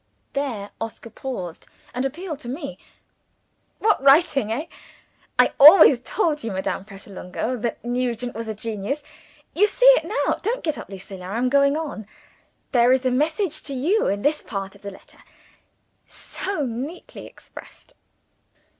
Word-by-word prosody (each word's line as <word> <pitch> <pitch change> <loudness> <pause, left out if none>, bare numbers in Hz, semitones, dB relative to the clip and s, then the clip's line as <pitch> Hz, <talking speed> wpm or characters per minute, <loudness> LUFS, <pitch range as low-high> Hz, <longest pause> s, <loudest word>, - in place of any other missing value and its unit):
'" - - -45
There 240 -8 -3
Oscar 225 0 -6
paused, 190 -10 -6 0.3
and 250 - -2
appealed 310 +2 -5
to 240 - -8
me. 280 +2 -6 1.0
"What 430 -7 +2
writing! 275 -4 +4
eh? 275 +8 -2 0.7
I - - +5
always 295 -3 +9
told 300 - -1
you, 225 - -3
Madame 190 0 -3
Pratolungo, 200 +3 -5
that 235 0 -4
Nugent 245 0 -2
was 230 +1 -6
a 220 - -4
genius. 225 +6 -4 0.5
You 415 +4 +4
see - - 0
it - - +7
now. 420 +8 0
Don't 475 +5 -2
get 310 -3 -2
up, - - -9
Lucilla. 190 -1 -9
I 200 +4 -3
am 250 +1 +1
going 280 +2 +3
on. 285 -10 -5 0.6
There 245 -1 +4
is 260 0 +2
a 255 - +2
message 315 - 0
to 280 - -6
you 345 +12 +1
in 200 +1 -1
this 300 +1 +1
part 195 -3 -5
of 200 - -19
the 200 - -6
letter. 190 - -16 0.9
So 380 -7 -5
neatly 265 +9 -7
expressed!" - - -15
255 Hz, 155 wpm, -23 LUFS, 220-305 Hz, 1.0 s, always